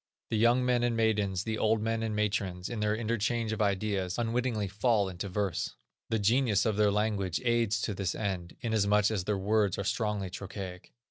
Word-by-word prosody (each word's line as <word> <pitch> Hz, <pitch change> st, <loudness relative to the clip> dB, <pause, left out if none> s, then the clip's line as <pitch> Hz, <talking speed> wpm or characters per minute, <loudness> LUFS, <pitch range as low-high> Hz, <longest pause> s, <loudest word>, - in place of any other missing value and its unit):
The 110 Hz, -, +1 dB
young 120 Hz, +3 st, +4 dB
men 125 Hz, -1 st, +2 dB
and 120 Hz, -1 st, +1 dB
maidens, 105 Hz, -4 st, +1 dB
the 110 Hz, 0 st, -3 dB
old 110 Hz, 0 st, +2 dB
men 115 Hz, +1 st, -1 dB
and 110 Hz, -1 st, -2 dB
matrons, 100 Hz, -4 st, -1 dB
in 120 Hz, -3 st, -4 dB
their 105 Hz, 0 st, +1 dB
interchange 115 Hz, 0 st, -1 dB
of 110 Hz, -, -2 dB
ideas, 100 Hz, -2 st, 0 dB
unwittingly 120 Hz, -2 st, 0 dB
fall 105 Hz, +1 st, +1 dB
into 95 Hz, +2 st, -5 dB
verse. 100 Hz, -2 st, -2 dB, 0.3 s
The 115 Hz, -, +1 dB
genius 110 Hz, 0 st, +2 dB
of 110 Hz, -2 st, +1 dB
their 105 Hz, 0 st, +4 dB
language 100 Hz, -4 st, 0 dB
aids 115 Hz, -2 st, +2 dB
to 105 Hz, -, -1 dB
this 95 Hz, -2 st, -2 dB
end, 95 Hz, -5 st, -3 dB
inasmuch 105 Hz, -3 st, +2 dB
as 95 Hz, -5 st, -2 dB
their 105 Hz, -1 st, 0 dB
words 100 Hz, 0 st, +1 dB
are 100 Hz, -, -2 dB
strongly 105 Hz, -2 st, -1 dB
trochaic. 95 Hz, -1 st, -7 dB
105 Hz, 190 wpm, -30 LUFS, 100-115 Hz, 0.3 s, young